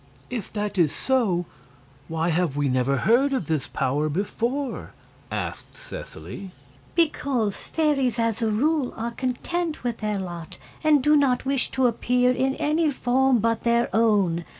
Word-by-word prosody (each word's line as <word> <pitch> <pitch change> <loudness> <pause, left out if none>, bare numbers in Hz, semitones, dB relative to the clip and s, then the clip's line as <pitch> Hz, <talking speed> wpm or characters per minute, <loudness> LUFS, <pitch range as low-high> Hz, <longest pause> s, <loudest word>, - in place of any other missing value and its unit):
"If 235 -6 -4
that 205 -2 -2
is 160 -4 +4
so, 215 -10 +1 0.6
why 165 +1 -1
have 165 -4 0
we 145 -1 +1
never 130 +1 +1
heard 260 - +3
of 255 -10 -1
this 155 -3 -1
power 145 +4 0
before?" 235 - -2 0.4
asked - - -5
Seseley. - - -8 0.5
"Because 275 - +1
fairies, 275 -7 0
as 230 0 0
a 225 - +2
rule, 275 +5 +1
are 230 +1 -3
content 300 +7 -3
with 240 -2 -2
their 210 -1 -1
lot, 175 -4 -6 0.3
and 300 -3 +4
do 300 +2 +5
not 270 -4 +2
wish 270 -1 +1
to 260 - +4
appear 250 +1 +2
in 265 +1 0
any 310 +1 +1
form 260 -1 +2
but 230 +1 +1
their 235 -2 +1
own. 200 -7 +3
235 Hz, 150 wpm, -24 LUFS, 190-270 Hz, 0.6 s, do